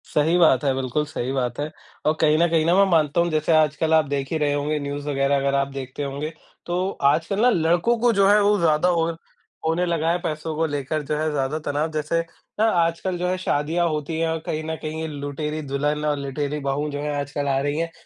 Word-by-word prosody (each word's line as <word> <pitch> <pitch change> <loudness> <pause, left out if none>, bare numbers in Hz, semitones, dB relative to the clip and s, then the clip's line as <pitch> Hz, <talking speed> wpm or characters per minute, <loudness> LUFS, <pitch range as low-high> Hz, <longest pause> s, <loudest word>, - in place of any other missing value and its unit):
सही 160 +4 +3
बात 155 -7 +4
है, 135 -2 +2
बिल्कुल 135 +3 -1
सही 140 -4 -4
बात 130 -2 -2
है। 150 +1 -3 0.3
और 155 - +4
कहीं 155 -1 +4
ना 170 +2 +4
कहीं 165 -2 +2
ना, 170 +2 +3
मैं 200 +1 +6
मानता 160 0 +3
हूँ, 175 - +1
जैसे 155 0 0
आजकल 155 +1 +2
आप 160 -1 +5
देख 140 -1 -3
ही 160 - +1
रहे 145 -2 +1
होंगे, 150 +1 -1
न्यूज़ 145 0 -5
वगैरह 135 0 +1
अगर 140 0 0
आप 140 0 +1
देखते 135 +1 -5
होंगे। 140 +3 -4 0.3
तो 180 +2 -1 0.2
आजकल 170 +6 -1
ना, 250 - +6
लड़कों 175 +4 +2
को 240 +1 +4
जो 195 -1 +4
है 210 +1 +5
वो 205 +1 +3
ज़्यादा 165 +1 +3
और 165 -1 0 0.5
होने 165 +3 +1
लगा 165 -1 0
है, 175 - +1
पैसों 155 0 -3
को 160 +1 +1
लेकर 145 0 -2
जो 150 +2 -1
है 155 +1 0
ज़्यादा 145 +1 -1
तनाव। 150 +2 -1
जैसे 155 +2 -1 0.4
ना, 220 - +4
आजकल 175 -2 +1
जो 180 +1 -1
है 185 +1 0
शादियाँ 170 0 0
होती 155 +1 -3
हैं 165 - +1
और 160 0 -1
कहीं 155 0 -3
ना 160 0 -3
कहीं, 155 0 -5
ये 160 - -3
लुटेरी 150 +1 -4
दुल्हन 145 +1 -1
और 150 -1 +1
लुटेरी 140 +2 -3
बहू 140 +2 -2
जो 145 - -4
हैं 150 0 -2
आजकल 140 0 -3
आ 135 -1 +2
रही 145 +1 -1
हैं। 165 0 -2
155 Hz, 240 wpm, -23 LUFS, 145-165 Hz, 0.5 s, मैं